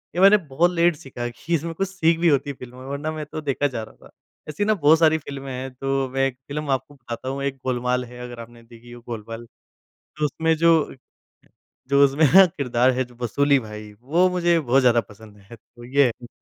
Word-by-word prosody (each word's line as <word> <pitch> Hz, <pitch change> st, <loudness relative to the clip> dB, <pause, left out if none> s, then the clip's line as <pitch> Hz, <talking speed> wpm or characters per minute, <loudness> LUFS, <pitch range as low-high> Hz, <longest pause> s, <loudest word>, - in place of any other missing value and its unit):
ये 180 Hz, -, 0 dB
मैंने 200 Hz, +2 st, +8 dB
बहुत 165 Hz, +6 st, +2 dB
लेट 170 Hz, -1 st, +2 dB
सीखा 135 Hz, -6 st, -10 dB
है 120 Hz, -, -3 dB
कि 165 Hz, +8 st, -6 dB
इसमें 165 Hz, +2 st, -3 dB
कुछ 195 Hz, +3 st, -2 dB
सीख 165 Hz, -4 st, +1 dB
भी 170 Hz, -, +2 dB
होती 140 Hz, -1 st, +1 dB
है -, -, -3 dB
फ़िल्म 125 Hz, 0 st, -11 dB
वरना 145 Hz, +3 st, -3 dB
मैं 155 Hz, -1 st, -5 dB
तो 155 Hz, +1 st, -7 dB
देखा 145 Hz, -1 st, 0 dB
जा 120 Hz, -5 st, -5 dB
रहा 110 Hz, -, -15 dB
था। -, -, -24 dB, 0.4 s
ऐसी 180 Hz, +7 st, -2 dB
ना 215 Hz, -, +3 dB
बहुत 160 Hz, -4 st, +4 dB
सारी 160 Hz, -1 st, +4 dB
फ़िल्में 140 Hz, -3 st, -8 dB
हैं 130 Hz, +1 st, -5 dB
तो 135 Hz, +1 st, -1 dB
मैं 135 Hz, 0 st, +2 dB
एक 125 Hz, -2 st, -7 dB
फ़िल्म 150 Hz, 0 st, -5 dB
आपको 135 Hz, +2 st, -2 dB
बताता 120 Hz, 0 st, -7 dB
हूँ 140 Hz, +1 st, -4 dB
एक 140 Hz, -1 st, -2 dB
गोलमाल 125 Hz, 0 st, -1 dB
है 125 Hz, 0 st, -12 dB
अगर 120 Hz, -1 st, -8 dB
आपने 115 Hz, 0 st, -12 dB
देखी 115 Hz, +1 st, -16 dB
हो 120 Hz, 0 st, -11 dB
गोलमाल। 115 Hz, 0 st, -7 dB, 0.7 s
तो 150 Hz, -, -1 dB
उसमें 160 Hz, +3 st, +1 dB
जो 165 Hz, -2 st, +3 dB, 0.9 s
जो 140 Hz, +1 st, +5 dB
उसमें 140 Hz, +3 st, +2 dB
ना 195 Hz, 0 st, +10 dB
किरदार 130 Hz, -7 st, +1 dB
है 130 Hz, +1 st, -1 dB
जो 125 Hz, -, -18 dB
वसूली 140 Hz, +4 st, +2 dB
भाई 105 Hz, -2 st, -9 dB
वो 170 Hz, +8 st, +2 dB
मुझे 175 Hz, -2 st, +2 dB
बहुत 135 Hz, -2 st, +2 dB
ज़्यादा 120 Hz, -2 st, +4 dB
पसंद 105 Hz, -1 st, -16 dB
है। 100 Hz, +4 st, -14 dB
तो 120 Hz, +2 st, -17 dB
ये 135 Hz, +3 st, +3 dB
है। 120 Hz, 0 st, -5 dB
135 Hz, 225 wpm, -23 LUFS, 120-155 Hz, 0.9 s, ना